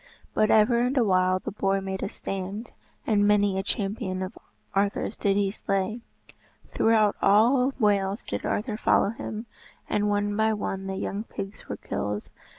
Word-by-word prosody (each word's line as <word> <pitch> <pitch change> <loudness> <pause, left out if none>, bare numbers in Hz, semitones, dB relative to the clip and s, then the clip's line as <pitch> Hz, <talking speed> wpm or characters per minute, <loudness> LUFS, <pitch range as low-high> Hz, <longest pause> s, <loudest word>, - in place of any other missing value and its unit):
But 215 - +3
ever 220 +2 +5
and 250 +3 +1
awhile 185 -5 +3
the - - -5
boar 195 -1 0
made 190 0 -4
a - - -2
stand, 195 +5 -5 0.3
and 205 -2 +3
many 205 -2 +3
a - - +1
champion 195 -1 -2
of 185 - -6 0.4
Arthur's 200 +2 0
did 200 -2 +1
he 200 -1 +1
slay. 195 +3 -2 0.7
Throughout 220 -2 +3
all 250 +6 +4
Wales 200 -3 +1
did - - -4
Arthur 215 0 -1
follow 200 - +3
him, 220 0 -5 0.4
and 210 0 +1
one 205 0 0
by 220 +1 +2
one 195 -2 -3
the 190 - -3
young 200 +2 -3
pigs 195 -2 -8
were - - -3
killed. 105 0 -4
205 Hz, 160 wpm, -26 LUFS, 195-220 Hz, 0.7 s, ever